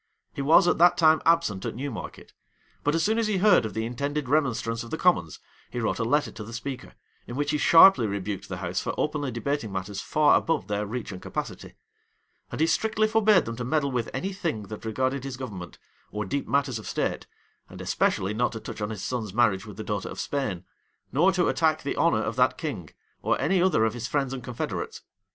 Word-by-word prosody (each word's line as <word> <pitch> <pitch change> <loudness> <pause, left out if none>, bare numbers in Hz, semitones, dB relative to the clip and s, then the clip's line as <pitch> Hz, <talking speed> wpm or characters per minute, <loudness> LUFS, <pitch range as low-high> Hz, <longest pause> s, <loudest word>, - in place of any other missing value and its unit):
He - - -4
was 160 +6 +5
at 175 - +2
that 175 +1 +6
time 160 -1 +5
absent 165 - +2
at - - -4
Newmarket; 135 -1 -7 0.5
but 145 +2 +1
as 165 - +1
soon 220 +2 +2
as 225 - +1
he 210 -2 0
heard 185 - +4
of 105 - -10
the 110 0 -1
intended 140 +4 -3
remonstrance 125 -5 0
of 115 - -10
the 160 - -3
commons, 125 - +1 0.3
he 120 - -4
wrote 115 - -1
a - - +1
letter 145 +6 +1
to 105 - -8
the 115 +2 -9
speaker, 130 +2 -6 0.3
in 120 - -6
which 145 +1 0
he 150 - 0
sharply 165 - +7
rebuked 100 0 -4
the 95 - -4
house 90 +1 -2
for - - -3
openly 150 -2 -1
debating 120 -1 -2
matters 95 +1 -4
far 150 -1 +4
above 165 -2 -1
their 105 0 -2
reach 120 0 -5
and 90 - -8
capacity; - - -6 0.8
and - - -4
he - - +5
strictly 215 +5 +1
forbade 215 -4 +4
them 115 - -5
to 125 - -3
meddle 140 +2 0
with 120 -3 -2
any 195 +1 -3
thing 165 - -3
that 110 +1 -8
regarded 130 +4 -1
his 135 -2 -5
government, 95 -10 -7 0.3
or 105 0 -3
deep 140 +8 -3
matters 135 -2 0
of 110 - -10
state, - - -2 0.4
and - - -11
especially 95 +2 0
not 120 +3 0
to 110 - -5
touch 110 - -8
on 105 - -2
his 105 -4 -6
son's 110 -6 -3
marriage 115 -3 +2
with 105 - -10
the 110 - -5
daughter 105 -2 -3
of - - -8
Spain, 110 -11 -2 0.5
nor 170 +8 +4
to 185 -2 +1
attack 155 +3 +1
the 140 - -2
honor - - +2
of - - -3
that - - +2
king, - - -5 0.3
or - - +1
any 185 +1 +2
other 180 -12 +3
of 110 - 0
his 120 0 -4
friends 135 -3 -1
and 130 - -6
confederates. 125 -3 -4
130 Hz, 225 wpm, -26 LUFS, 110-155 Hz, 0.8 s, sharply